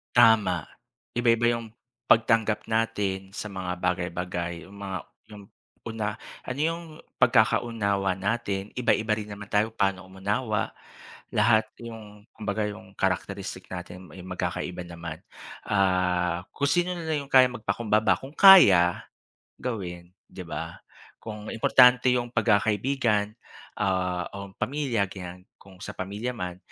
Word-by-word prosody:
Tama. 110 Hz, -8 st, +5 dB, 0.5 s
Iba-iba 120 Hz, 0 st, +3 dB
'yong, 115 Hz, -1 st, -5 dB, 0.3 s
pagtanggap 110 Hz, -1 st, +3 dB
natin 100 Hz, -4 st, -1 dB
sa 105 Hz, -, -5 dB
mga 90 Hz, -2 st, -4 dB
bagay-bagay. 90 Hz, -1 st, -2 dB
'Yong 95 Hz, -, -15 dB
mga 95 Hz, -2 st, -4 dB, 0.3 s
'yong 105 Hz, -1 st, -12 dB, 0.4 s
una 110 Hz, -2 st, -3 dB, 0.3 s
ano 130 Hz, +2 st, -4 dB
'yong 165 Hz, +1 st, -1 dB, 0.4 s
pagkakaunawa 100 Hz, -5 st, +2 dB
natin, 100 Hz, 0 st, -2 dB
iba-iba 115 Hz, -2 st, +1 dB
rin 105 Hz, -1 st, -1 dB
naman 105 Hz, 0 st, -11 dB
tayo 110 Hz, +2 st, +1 dB
paano 95 Hz, -3 st, 0 dB
umunawa. 100 Hz, +3 st, -2 dB, 0.6 s
Lahat 110 Hz, 0 st, +4 dB, 0.2 s
'yong, 105 Hz, -3 st, -10 dB
kumbaga 105 Hz, 0 st, -2 dB
'yong 100 Hz, -1 st, -10 dB
characteristic 95 Hz, 0 st, -3 dB
natin 90 Hz, 0 st, -8 dB
ay 90 Hz, -, -10 dB
magkakaiba 90 Hz, -1 st, -4 dB
naman. 85 Hz, -2 st, -7 dB, 0.5 s
Ah, 90 Hz, -2 st, +1 dB
kung 140 Hz, -, +1 dB
sino 175 Hz, +3 st, +1 dB
na 170 Hz, -, -6 dB
lang 150 Hz, -3 st, -1 dB
'yong -, -, -29 dB
kayang 125 Hz, -1 st, +5 dB
magpakumbaba 110 Hz, -1 st, +1 dB
kung 135 Hz, -, -10 dB
kaya, 100 Hz, -, +8 dB, 0.6 s
gawin, 90 Hz, -7 st, -5 dB, 0.2 s
'di 95 Hz, -, -9 dB
ba. -, -, -6 dB, 0.4 s
Kung 105 Hz, -1 st, -7 dB
importante 125 Hz, +2 st, +5 dB
'yong 120 Hz, -1 st, 0 dB
pagkakaibigan, 110 Hz, 0 st, +1 dB, 0.4 s
ah, 90 Hz, -2 st, 0 dB
o 100 Hz, 0 st, -7 dB
pamilya 130 Hz, -7 st, 0 dB
ganyan, 90 Hz, -1 st, -9 dB, 0.2 s
kung 95 Hz, -1 st, -16 dB
sa 100 Hz, -, -6 dB
pamilya 105 Hz, +6 st, -4 dB
man, 90 Hz, -6 st, -5 dB
105 Hz, 125 wpm, -26 LUFS, 95-115 Hz, 0.6 s, kaya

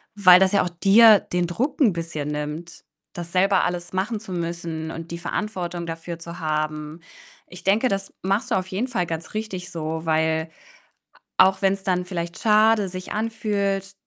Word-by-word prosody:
weil 185 Hz, -3 st, +8 dB
das 190 Hz, -1 st, +4 dB
ja 200 Hz, -, +4 dB
auch 180 Hz, -, -2 dB
dir 200 Hz, +4 st, +6 dB
den 180 Hz, 0 st, -2 dB
Druck 260 Hz, -, -2 dB
'n 220 Hz, -9 st, +5 dB
bisschen 160 Hz, -3 st, -4 dB
nimmt, 150 Hz, +3 st, -5 dB, 0.3 s
das 175 Hz, -1 st, -7 dB
selber 190 Hz, +1 st, +3 dB
alles 175 Hz, 0 st, -3 dB
machen 205 Hz, +4 st, -1 dB
zu 200 Hz, -4 st, -8 dB
müssen 165 Hz, -2 st, -4 dB
und 165 Hz, 0 st, -8 dB
die 170 Hz, -, -4 dB
Verantwortung 175 Hz, -2 st, -4 dB
dafür 165 Hz, +1 st, -6 dB
zu 170 Hz, +1 st, -9 dB
haben. 155 Hz, 0 st, -3 dB, 0.5 s
Ich 180 Hz, 0 st, -12 dB
denke, 210 Hz, +6 st, +3 dB
das 195 Hz, -2 st, -3 dB
machst 195 Hz, +4 st, 0 dB
du -, -, +3 dB
auf 185 Hz, 0 st, -1 dB
jeden 200 Hz, +7 st, -2 dB
Fall 180 Hz, -9 st, -2 dB
ganz 165 Hz, 0 st, -5 dB
richtig 190 Hz, -4 st, -5 dB
so, 160 Hz, 0 st, -4 dB
weil 160 Hz, 0 st, +1 dB, 0.9 s
a 185 Hz, -, +9 dB
auch 190 Hz, +1 st, -4 dB
wenn's 195 Hz, 0 st, +1 dB
dann 180 Hz, -1 st, 0 dB
vielleicht 170 Hz, -1 st, -5 dB
schade 215 Hz, -2 st, +4 dB
sich 185 Hz, 0 st, -7 dB
anfühlt, 200 Hz, -3 st, -2 dB
180 Hz, 180 wpm, -23 LUFS, 165-195 Hz, 0.9 s, a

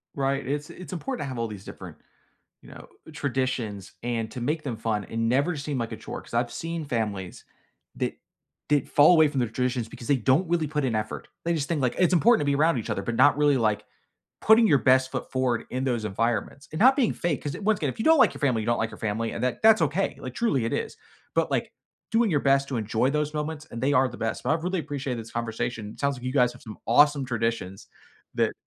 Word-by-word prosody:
Right. 135 Hz, 0 st, -1 dB
It's 145 Hz, +3 st, -3 dB
it's 185 Hz, -, -10 dB
important 250 Hz, +8 st, -4 dB
to -, -, -5 dB
have 130 Hz, -2 st, -5 dB
all 115 Hz, -, -1 dB
these 105 Hz, -3 st, -9 dB
different, -, -, -10 dB, 0.6 s
you -, -, -15 dB
know, -, -, -12 dB, 0.3 s
traditions 130 Hz, -8 st, -3 dB
and 115 Hz, -2 st, -2 dB
to 125 Hz, -, -6 dB
make 150 Hz, +5 st, -1 dB
them 125 Hz, -5 st, -3 dB
fun 110 Hz, -2 st, -2 dB
and 115 Hz, 0 st, -1 dB
never 140 Hz, +7 st, +1 dB
seem 145 Hz, -1 st, -4 dB
like 115 Hz, -2 st, -3 dB
a -, -, -6 dB
chore. -, -, -7 dB
'Cause -, -, -17 dB
I've 120 Hz, 0 st, 0 dB
seen 165 Hz, +4 st, -4 dB
families 105 Hz, -8 st, -3 dB, 0.5 s
that -, -, -2 dB, 0.5 s
did 145 Hz, -2 st, +1 dB
fall 150 Hz, +4 st, +6 dB
away 160 Hz, -3 st, +5 dB
from 140 Hz, -2 st, -2 dB
their 120 Hz, -, +1 dB
traditions 125 Hz, -1 st, -1 dB
because 120 Hz, -, -10 dB
they 140 Hz, -, +3 dB
don't 135 Hz, -, +2 dB
really 165 Hz, -3 st, +1 dB
put 150 Hz, 0 st, -2 dB
in 125 Hz, -4 st, 0 dB
effort. 110 Hz, 0 st, -4 dB, 0.2 s
They 170 Hz, -, +1 dB
just 145 Hz, -4 st, -2 dB
think, 160 Hz, -4 st, 0 dB
like, 125 Hz, -2 st, 0 dB
it's 180 Hz, 0 st, +3 dB
important 225 Hz, +5 st, +5 dB
to -, -, -1 dB
be 140 Hz, 0 st, +2 dB
around 155 Hz, 0 st, +3 dB
each 115 Hz, -, -5 dB
other, -, -, -1 dB
but 120 Hz, +3 st, -3 dB
not 140 Hz, +4 st, +5 dB
really, 145 Hz, -2 st, +4 dB
like, 105 Hz, -3 st, 0 dB, 0.6 s
putting 220 Hz, +1 st, +6 dB
your 145 Hz, -, +5 dB
best 130 Hz, +2 st, +3 dB
foot -, -, -5 dB
forward 130 Hz, -3 st, 0 dB
in 130 Hz, +1 st, -2 dB
those 120 Hz, -4 st, -1 dB
environments 115 Hz, +5 st, -2 dB
and 155 Hz, -, -4 dB
not 260 Hz, +5 st, +6 dB
being 265 Hz, -6 st, +2 dB
fake. 170 Hz, -5 st, -2 dB
'Cause 145 Hz, -, -4 dB
i -, -, -8 dB
once 215 Hz, -1 st, +1 dB
again, 145 Hz, -, 0 dB
if -, -, -11 dB
you 220 Hz, -, -2 dB
don't 320 Hz, 0 st, +6 dB
like -, -, +5 dB
your -, -, -10 dB
family, 125 Hz, -6 st, +1 dB
you -, -, -6 dB
don't 120 Hz, 0 st, +1 dB
like 115 Hz, -, -1 dB
your -, -, -10 dB
family, 110 Hz, +1 st, -2 dB
and -, -, -5 dB
that 125 Hz, -, -1 dB
that's 220 Hz, -5 st, +6 dB
okay. 160 Hz, +6 st, 0 dB
Like, 130 Hz, -1 st, -7 dB
truly, 145 Hz, -, +1 dB
it 115 Hz, -, -2 dB
is. -, -, -3 dB, 0.4 s
But, -, -, +1 dB
like, -, -, -1 dB, 0.4 s
doing 225 Hz, -1 st, +3 dB
your 150 Hz, -4 st, +2 dB
best 140 Hz, 0 st, +2 dB
to 130 Hz, -, -2 dB
enjoy 115 Hz, +4 st, 0 dB
those 150 Hz, 0 st, -1 dB
moments, 150 Hz, 0 st, -4 dB
and 115 Hz, -, -7 dB
they 140 Hz, +2 st, +2 dB
are 130 Hz, -1 st, +4 dB
the 120 Hz, -, -10 dB
best. 110 Hz, -1 st, -3 dB
But -, -, 0 dB
I -, -, +4 dB
really 185 Hz, +1 st, -1 dB
appreciate 140 Hz, -4 st, -3 dB
this 115 Hz, -1 st, -8 dB
conversation. 115 Hz, -1 st, -3 dB
It -, -, -14 dB
sounds 140 Hz, 0 st, +1 dB
like 125 Hz, -, -12 dB
you 130 Hz, -, -2 dB
guys 125 Hz, -3 st, +3 dB
have 125 Hz, -, -16 dB
some 110 Hz, -2 st, -10 dB
awesome 145 Hz, +3 st, +4 dB
traditions 115 Hz, -6 st, -3 dB, 0.5 s
that -, -, +1 dB
130 Hz, 255 wpm, -26 LUFS, 115-150 Hz, 0.6 s, fall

